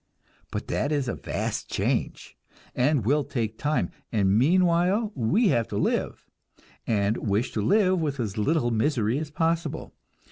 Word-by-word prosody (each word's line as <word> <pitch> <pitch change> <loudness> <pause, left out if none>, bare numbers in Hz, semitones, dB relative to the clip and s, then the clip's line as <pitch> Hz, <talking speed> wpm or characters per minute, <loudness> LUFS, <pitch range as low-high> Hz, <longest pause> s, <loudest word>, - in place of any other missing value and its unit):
But - - -5
that 145 - -1
is 145 -4 0
a 120 - -1
vast - - -4
change, - - -2 0.4
and 130 -3 +1
will 145 +5 +2
take 115 -5 -3
time, 150 +1 0 0.2
and 100 -3 +2
meanwhile 180 - +3
we 170 - +2
have 115 -6 +1
to 100 - -4
live, - - -1 0.6
and 105 0 +1
wish 105 +4 -1
to 110 - -2
live 185 - +3
with 145 -4 -2
as 105 -4 -2
little 120 +3 +1
misery 115 0 +1
as 155 -1 -5
possible. 165 0 -2
140 Hz, 150 wpm, -26 LUFS, 110-165 Hz, 0.6 s, meanwhile